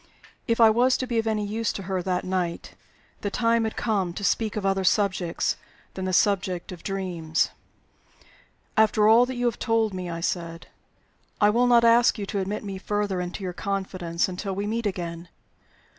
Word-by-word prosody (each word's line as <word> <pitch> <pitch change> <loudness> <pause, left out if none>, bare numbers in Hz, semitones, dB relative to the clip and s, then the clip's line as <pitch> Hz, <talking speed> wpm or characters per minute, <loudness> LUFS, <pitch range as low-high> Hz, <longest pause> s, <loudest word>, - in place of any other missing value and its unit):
If 230 0 +1
I 225 -1 +8
was 250 +3 +3
to 255 - -2
be 235 -2 0
of 225 - -2
any 215 -1 0
use 220 +2 -1
to 195 - -6
her 190 0 -2
that 180 0 -1
night, 180 -2 -3 0.5
the 205 - -2
time 230 +2 +1
had 220 - -3
come 195 -6 -1
to 200 - -6
speak 215 +1 0
of 210 -2 -3
other 195 0 +1
subjects 185 -3 +1 0.4
than 190 - -4
the 185 - -1
subject 185 -1 +1
of 175 -2 -9
dreams. 175 -5 -1 1.2
"After 215 -1 +4
all 235 +3 +6
that 260 - -4
you 245 0 -1
have 235 - 0
told 225 -3 +1
me," 180 -1 -5
I 165 0 -4
said, 170 -1 -3 0.7
"I 210 0 +5
will 245 +3 +3
not 240 -1 +5
ask 235 +1 +5
you 205 - -3
to 200 0 -3
admit 200 +3 -3
me 200 -1 -5
any 190 - -6
further 205 -2 -1
into 180 +3 -5
your 180 -1 -3
confidence 185 -3 -2
until 190 +1 -4
we 200 +1 -2
meet 225 +1 -1
again. 170 -3 -5
200 Hz, 195 wpm, -25 LUFS, 180-220 Hz, 1.2 s, I